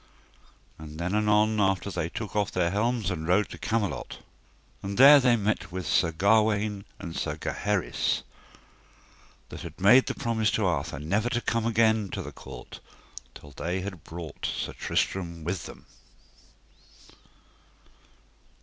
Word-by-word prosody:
And 75 0 -9
then 90 +3 -2
anon 105 +1 +3
after 95 0 +1
they 85 -3 -2
took 105 +3 -6
off 105 -2 +1
their 85 -2 0
helms 110 -1 0
and 80 -2 -4
rode 95 +4 +2
to - - -10
Camelot. 110 -3 -2 0.6
And 100 0 -5
there 140 +3 +9
they 125 -2 +4
met 105 -4 -1
with 95 0 -5
Sir 85 - +2
Gawaine 105 +2 +2
and 85 - -7
with 85 - -5
Sir - - -2
Gaheris 105 -2 -1 1.3
that - - -8
had - - -9
made 120 +7 +6
promise 110 -2 0
to 110 - +1
Arthur 85 -3 -1
never 100 - 0
to 120 - 0
come 115 -1 -1
again 110 -2 +2
to - - -3
the - - -8
court - - -11 0.6
till 75 - -12
they 90 +7 -3
had 95 -4 -7
brought 85 -2 -6
Sir - - -3
Tristram 85 -4 -2
with 90 +2 -3
them. - - -12
100 Hz, 145 wpm, -27 LUFS, 85-110 Hz, 1.3 s, there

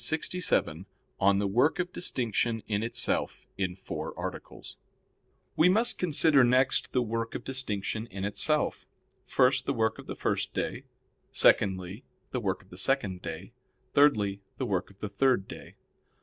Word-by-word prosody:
_______________________ - - +2
QUESTION 160 - +3 0.2
67 85 - +1 0.3
ON 100 0 +4
THE 100 - 0
WORK 120 +10 +2
OF 180 0 -2
DISTINCTION 115 - -1
IN 105 -1 0
ITSELF 120 +1 -1
(In 95 -2 -2
Four 95 - -6
Articles) - - -7 0.8
We 165 +3 +5
must 225 +6 +2
consider 155 -5 +4
next 130 +2 +2
the 125 - +2
work 115 0 -3
of - - -4
distinction 110 -4 -3
in 100 -2 -5
itself. 150 +9 -1 0.4
First, 130 0 +3
the 140 - +1
work 110 -1 0
of - - -11
the - - -5
first - - -2
day; - - -3 0.5
secondly, 95 +2 +2 0.3
the 125 - -1
work 95 -2 -2
of 95 - -26
the 90 - -10
second 100 -8 0
day; - - -7 0.4
thirdly 105 -9 +3 0.2
the 130 - -2
work 95 -6 -1
of 100 - -19
the 105 - -2
third 125 -5 +2
day. - - -10
115 Hz, 165 wpm, -29 LUFS, 100-135 Hz, 0.8 s, We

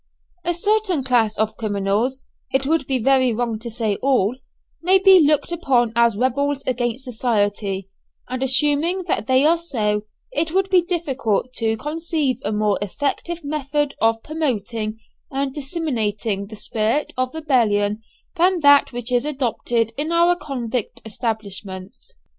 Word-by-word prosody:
A 345 0 0
certain 405 -4 +1
class 235 -4 +2
of 220 0 0
criminals 215 +5 -1 0.3
it 265 0 +1
would 310 -1 +1
be 265 - +1
very 260 +1 +3
wrong 230 -1 -2
to 235 +1 -6
say 220 -3 -1
all 250 -5 +1 0.5
may 370 +3 +5
be 380 -1 +7
looked 300 +1 +3
upon 255 -9 +1
as 235 -2 +4
rebels 275 +3 0
against 245 0 -1
society, 205 -5 -1 0.4
and 255 +1 -4
assuming 295 +7 +2
that - - -1
they 260 +2 +4
are 330 +2 +4
so, 215 -10 -1 0.3
it 315 +2 0
would 385 0 +1
be 365 -2 +6
difficult 270 - -1
to 225 -1 0
conceive 300 -2 -1
a - - -1
more 210 -1 +1
effective 290 - -3
method 290 0 -1
of 225 0 +2
promoting 230 -8 -2 0.3
and 270 -1 -2
disseminating 225 - -2
the 215 - -9
spirit 220 +7 -1
of 255 +2 -2
rebellion 220 -9 +1 0.4
than 355 +1 +3
that 285 -1 +6
which 245 0 -4
is 245 0 +2
adopted 240 -5 -1
in 305 +3 -2
our 340 +1 +4
convict 250 - -4
establishments. 205 -4 -5
255 Hz, 145 wpm, -21 LUFS, 220-300 Hz, 0.5 s, be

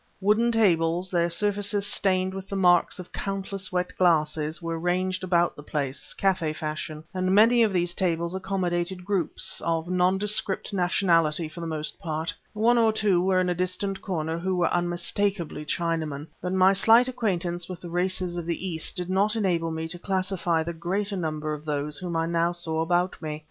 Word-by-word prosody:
Wooden 215 +4 +3
tables, 180 -5 +2
their 170 -1 +2
surfaces 205 +2 0
stained 190 -2 +1
with 195 0 -7
the 200 - -3
marks 180 -2 +3
of 180 -2 -9
countless 195 -1 -4
wet 180 0 -2
glasses, 155 -3 +2
were 165 -1 -4
ranged 185 +2 -1
about 175 -2 +2
the - - -10
place, 140 -2 -4
café 180 -5 +1
fashion; 155 0 -5
and 185 0 +1
many 230 +3 +6
of 220 -2 +4
these 175 -2 0
tables 170 -1 -1
accommodated 185 -1 -2
groups, 190 -5 -1
of 165 0 -1
nondescript 190 +3 +1
nationality 170 -4 +2
for 155 - -11
the 165 - -4
most 155 -1 -3
part. 160 0 -3 0.2
One 235 +3 +3
or 225 -1 +4
two 215 -1 +1
there 175 - +4
were 185 0 +2
in 180 - 0
a - - +2
distant 185 +2 -2
corner 165 -4 -2
who 185 +2 -1
were 175 -1 +1
unmistakably 175 -1 -1
Chinamen; 155 -3 -2 0.2
but 180 - -3
my 190 +1 +5
slight 225 +5 +5
acquaintance 180 -9 -2
with 180 -2 -6
the 175 - -8
races 180 0 -1
of 170 -1 -5
the 175 +2 -2
East 160 +2 -2
did 180 -1 -1
not 200 +4 +2
enable 175 -6 0
me 160 0 -4
to 175 +2 -4
classify 185 -3 0
the 170 +1 -4
greater 195 +5 -2
number 155 -3 -2
of 150 0 -7
those 150 -1 -3
whom 175 -2 -4
I 165 - +1
now 170 +1 +1
saw 160 -2 -1
about 175 +2 0
me. 155 -1 -4
180 Hz, 185 wpm, -26 LUFS, 165-195 Hz, 0.2 s, many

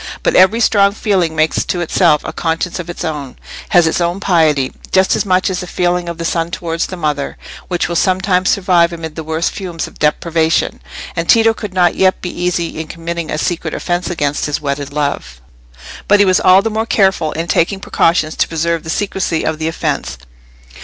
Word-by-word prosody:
But - - +1
every 190 +5 +5
strong 200 -3 +3
feeling 190 -7 0
makes 155 0 +1
to 180 - -2
itself 155 -3 +2
a 155 - -5
conscience 165 +2 -2
of 175 -1 -6
its 175 - -5
own—has 155 +4 -1
its 160 +2 0
own 175 +2 0
piety; 155 -8 +2 0.2
just 190 0 +3
as - - -1
much 185 0 +2
as 185 -1 -1
the 180 - -6
feeling 175 0 -1
of 170 - -6
the 170 - -4
son 165 0 -1
towards 165 -1 -3
the 185 - -7
mother, 150 -4 -2 0.3
which 175 -2 -1
will 170 - -4
sometimes 185 +1 +1
survive 180 -3 +3
amid 165 -2 -6
the 160 - -5
worst 160 +2 -1
fumes 175 -5 -5
of - - -14
depravation; 160 +2 0 0.3
and 165 -1 -3
Tito 225 0 +5
could 210 -4 -7
not 175 -1 +3
yet 190 0 +2
be 180 - -5
easy 175 -2 -2
in 160 - -5
committing 170 0 -5
a - - -2
secret 175 +1 -2
offence 175 0 -2
against 145 -5 -1
his 150 - -2
wedded 140 -1 -3
love. 140 - -3 0.7
But 205 0 +5
he 205 - +6
was 185 -1 +3
all 185 +2 +5
the 225 - -1
more 220 +1 -2
careful 190 -8 +2
in 165 +1 -3
taking 185 +4 +1
precautions 165 -4 +1
to - - +2
preserve 165 0 -1
the 160 - -8
secrecy 190 -3 -1
of 160 0 -2
the 160 - -2
offence. 145 - -3
170 Hz, 200 wpm, -16 LUFS, 160-185 Hz, 0.7 s, he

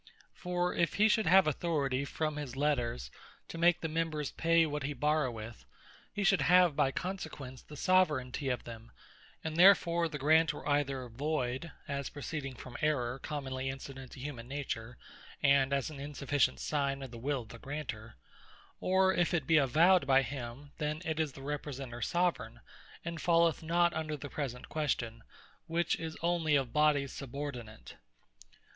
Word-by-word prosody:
For 180 0 -1
if 170 - +1
he 210 +2 +5
should 220 -3 +2
have 190 +3 +7
Authority 140 -3 0
from 155 +1 -2
his 140 -4 -5
Letters, 120 - -1 0.4
to - - -7
make 175 0 +4
the 160 - -1
members 155 -2 -2
pay 165 0 +3
what 150 -1 -3
he 145 +2 -3
borroweth, 125 -6 -1 0.5
he 205 - -2
should 195 0 +4
have 180 -3 +5
by 145 -2 +3
consequence 145 -7 -5
the 150 - -12
Soveraignty 145 -7 +2
of 125 - -3
them; 115 0 -10 0.5
and 160 0 -4
therefore 170 -2 +6
the 150 - -5
grant 155 +2 +4
were - - -8
either 140 -3 0
voyd, 130 +3 -2 0.2
as 140 -1 -3
proceeding 145 -2 -5
from 125 +1 -9
Errour, 135 -4 0
commonly 135 -2 -4
incident 135 -1 -8
to - - -10
humane 125 -3 -6
Nature, 125 -4 -5 0.5
and 140 -1 +4
an 140 +1 -1
unsufficient 140 -2 0
signe 140 -2 -1
of 130 - -8
the 120 - -9
will 135 +2 -1
of 115 - -14
the 115 - -10
Granter; 130 -6 -6 0.6
or 190 0 +3
if 175 0 +1
it 155 -5 -1
be 160 +3 +4
avowed 160 +6 +4
by 135 0 +5
him, 135 +1 -7
then 150 +1 -2
is 160 -4 -1
the 135 - -11
Representer 135 -4 -5
Soveraign, 165 -10 -1 0.4
and 170 -1 -4
falleth 170 -2 +3
not 170 +1 +2
under 155 -1 -3
the 145 - -7
present 130 -4 -4
question, 120 -7 -2 0.5
which 170 0 +1
is 160 -1 -5
onely 170 -3 +2
of 135 -4 0
Bodies 150 -2 +3
subordinate. 130 -5 -7
145 Hz, 160 wpm, -32 LUFS, 130-160 Hz, 0.6 s, have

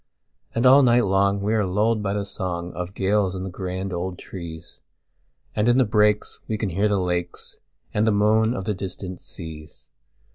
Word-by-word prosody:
And 115 +2 +1
all 135 +3 +8
night 120 -2 +4
long 100 +1 +2
we 105 +2 0
are 110 -2 +2
lulled 105 +4 +1
by 100 -1 -1
the 105 - 0
songOf 90 -1 -4
gales 95 -1 +1
in 95 - -4
the 95 - -5
grand 95 +1 -4
old 90 +1 -3
trees; 85 -4 -9 0.8
And 110 +2 +2
in 120 - +4
the 130 - +5
breaks 105 0 +2
we 110 - -1
can 105 -2 -2
hear 100 +4 +1
the 105 -1 +1
lakesAnd 90 -2 -3 0.5
the 110 - +4
moan 110 +3 +3
of 95 - -4
the 105 - 0
distant 95 -1 -6
seas. 75 -2 -10
100 Hz, 180 wpm, -24 LUFS, 90-105 Hz, 0.8 s, all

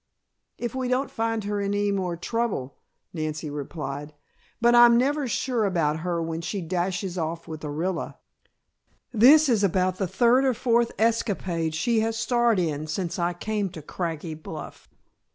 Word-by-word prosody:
"If 240 -2 -4
we 260 -1 -2
don't 255 +2 0
find 225 -1 -1
her 205 0 -2
in 200 0 -1
any 205 0 +1
more 185 -3 -2
trouble," 195 - -3 0.3
Nancy 155 -2 -4
replied. 145 0 -6 0.4
"But 235 +1 +4
I'm 240 0 +8
never 280 +3 +1
sure 240 0 0
about 165 -6 +1
her 170 0 -2
when 165 0 -3
she 200 +4 -3
dashes 180 +1 -2
off 165 +1 -4
with 155 -2 -7
Orilla. 165 +4 -3 1.0
This 280 +8 +7
is 225 -5 +2
about 185 -1 +1
the 190 - -1
third 245 +7 +3
or 260 -3 +2
fourth 235 -1 +2
escapade 190 -8 0
she 225 +8 +1
has 225 +1 0
starred 240 -2 +2
in 155 -4 -1
since 170 +3 -3
I 175 +1 0
came 205 +2 -2
to 155 - -9
Craggy 165 0 -4
Bluff." 155 0 -9
190 Hz, 160 wpm, -25 LUFS, 165-230 Hz, 1.0 s, I'm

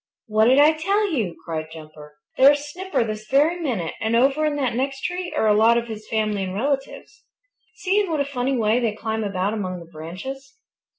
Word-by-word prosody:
"What 215 0 +2
did 255 +3 +5
I 295 +2 +7
tell 395 +6 0
you?" 220 - -1
cried 160 -2 -4
Jumper. 155 -2 -12 0.2
"There's 285 +2 +6
Snipper 375 -5 -1
this 215 -1 -6
very 300 +6 +3
minute, 230 - -2
and 225 +1 0
over 270 +5 +3
in 300 -1 0
that 265 -4 -1
next 270 +2 -2
tree 360 0 -3
are - - +2
a 215 - +5
lot 225 +3 +5
of 235 0 -2
his 215 -1 -8
family 215 -3 -1
and 185 0 -4
relatives. 275 - -3 0.5
See 390 +2 +1
in 395 - -3
what 315 -2 -1
a 280 - +1
funny 265 -1 -1
way 220 +1 +2
they 225 -4 -1
climb 220 0 -3
about 200 0 -1
among 185 -4 -3
the 170 - -10
branches. 265 - -8
235 Hz, 210 wpm, -22 LUFS, 210-285 Hz, 0.5 s, I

